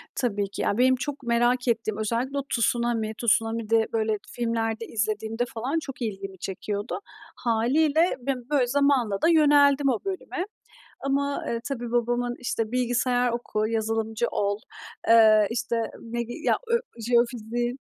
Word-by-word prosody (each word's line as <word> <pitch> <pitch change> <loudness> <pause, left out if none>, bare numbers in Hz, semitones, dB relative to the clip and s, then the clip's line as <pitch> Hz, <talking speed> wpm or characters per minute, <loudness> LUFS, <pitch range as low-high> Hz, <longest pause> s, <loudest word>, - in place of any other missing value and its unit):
Tabii 205 -6 -1
ki. 200 - -5
Ya, 200 - 0
benim 260 +1 +5
çok 280 +2 -5
merak 240 +1 +2
ettiğim, 225 -2 0
özellikle 235 +6 -1
o 280 - -1
tsunami. 235 -2 0
Tsunami 225 -1 +1
de 225 -1 +3
böyle 220 -1 +1
filmlerde 230 -1 -2
izlediğimde 220 +2 -1
falan 255 +8 -1
çok 270 -4 -9
ilgimi 195 -4 -4
çekiyordu. 205 +3 -4 0.4
Hâliyle, 285 +9 +2
ben 250 -1 -4
böyle 280 -4 +2
zamanla 255 -6 +2
da - - +4
yöneldim 290 -3 +5
o 240 -5 +1
bölüme 375 -1 -3 0.6
ama, 280 +1 -1
eee, 230 0 -1
tabii, 240 -4 -4
babamın, 240 0 0
işte, 240 -3 -2
"Bilgisayar 245 0 +1
oku, 215 -2 -1
yazılımcı 225 +1 -1
ol." 200 0 0 0.5
Eee, 220 -2 +7
işte, 235 0 -1 0.2
medi 235 0 -4
ya, - - +3
ö 470 0 +3 0.2
jeofiziğin 240 +1 0
235 Hz, 140 wpm, -26 LUFS, 225-255 Hz, 0.6 s, Eee